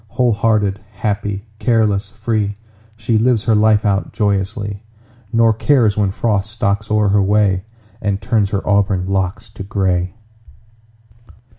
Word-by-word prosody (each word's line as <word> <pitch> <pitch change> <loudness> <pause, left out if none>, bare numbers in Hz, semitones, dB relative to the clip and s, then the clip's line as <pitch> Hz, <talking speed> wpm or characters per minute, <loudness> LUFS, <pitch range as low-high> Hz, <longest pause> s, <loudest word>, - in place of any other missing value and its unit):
Whole 120 +3 +1
hearted, 105 -2 +1
happy, 100 0 -3
careless, 110 -4 +1
free, 110 -2 -2 0.4
She 110 0 0
lives 115 -1 +2
her 115 - +2
life 110 0 +3
out 100 -1 0
joyously, 100 0 -1 0.5
Nor 115 -1 +4
cares 110 -2 +2
when 105 -2 +1
Frost 105 0 -1
stalks 105 -1 -1
o'er 105 -1 +2
her 100 +1 +3
way 100 -1 +2 0.4
And 100 -2 -1
turns 110 -4 0
her 100 -1 -3
auburn 100 -2 +2
locks 95 +3 -2
to 100 - -10
gray. 95 -2 -1
105 Hz, 135 wpm, -18 LUFS, 100-110 Hz, 0.5 s, Nor